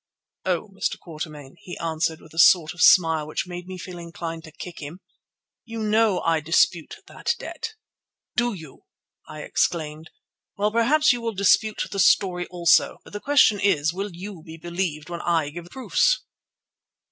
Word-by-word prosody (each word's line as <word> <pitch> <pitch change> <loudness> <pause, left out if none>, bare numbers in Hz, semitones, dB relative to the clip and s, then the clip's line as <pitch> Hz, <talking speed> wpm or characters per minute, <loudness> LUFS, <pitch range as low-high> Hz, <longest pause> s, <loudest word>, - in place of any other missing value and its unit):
"Oh, 185 +2 -1
Mr. 195 0 -3
Quatermain," 155 -3 -8
he 175 - -9
answered 160 0 -2
with 155 - -17
a 165 - -5
sort 165 -3 +6
of 175 - -7
smile 160 -3 +5
which 155 - -3
made 180 0 -8
me 185 0 -7
feel 180 0 -8
inclined 165 -1 -6
to 160 - -12
kick 175 +2 -9
him, 150 +4 -8 0.6
"you 230 -1 -8
know 215 -2 +2
I 165 -2 +2
dispute 165 +1 +1
that - - -2
debt." 445 - -7 0.6
"Do 240 -1 +1
you?" 160 -6 -13 0.4
I 155 0 -7
exclaimed. 155 -1 -1 0.5
"Well, 210 +1 +1
perhaps 260 +6 +4
you 240 - -4
will 230 -2 -3
dispute 205 +2 +3
the 200 - -3
story 180 -2 +3
also. 175 -2 +3
But - - -16
the 205 - -4
question 270 -6 +4
is, 160 -6 +2
will 195 +3 -4
you 185 -1 -8
be 160 +1 -11
believed 170 -3 -3
when 170 - -4
I 165 -4 +1
give 170 +2 -8
the - - -15
proofs?" 265 - +1
175 Hz, 170 wpm, -24 LUFS, 160-200 Hz, 0.6 s, sort